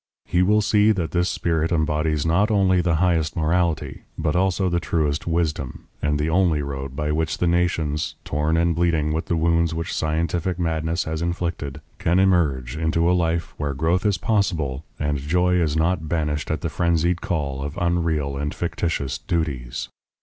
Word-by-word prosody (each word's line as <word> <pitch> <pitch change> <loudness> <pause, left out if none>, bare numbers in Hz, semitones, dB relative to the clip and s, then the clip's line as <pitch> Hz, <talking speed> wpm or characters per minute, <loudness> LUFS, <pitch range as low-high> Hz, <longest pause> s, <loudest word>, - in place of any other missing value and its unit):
He 90 - +1
will 105 +3 +3
see 105 +1 +4
that 85 -5 -2
this 90 +1 +1
spirit 80 -1 0
embodies 75 -2 +1
not 90 +6 +3
only 95 -4 +3
the 85 -2 +1
highest 85 -2 +1
morality, 85 0 0 0.2
but 80 -2 0
also 95 +1 +2
the 85 -1 +1
truest 80 -2 -1
wisdom, 80 -6 -1 0.2
and 75 0 +1
the 75 +1 0
only 80 -3 +2
road 70 -1 -5
by 75 +1 -1
which 80 +1 -1
the - - 0
nations, 85 -3 0
torn 75 +2 0
and 85 0 +2
bleeding 80 -2 +1
with 80 - -2
the 85 - +1
wounds 85 0 +2
which 85 +1 -3
scientific 85 +3 -1
madness 80 0 -1
has 80 0 -3
inflicted, 85 -5 -3 0.2
can 85 +2 +2
emerge 75 -10 +2
into 80 +1 +1
a 90 - +4
life 85 -1 0
where 70 -2 -2
growth 85 +6 +1
is 105 -2 +2
possible 85 - 0 0.2
and 75 -1 0
joy 90 +6 +2
is 80 -2 0
not 80 -1 0
banished 75 -3 -1
at 80 - -1
the 85 - -2
frenzied 85 +2 +1
call 70 -5 -2
of 70 +1 -5
unreal 80 -5 0
and 75 +1 -3
fictitious 85 -5 -2
duties. 70 -8 -2
80 Hz, 175 wpm, -23 LUFS, 75-85 Hz, 0.2 s, see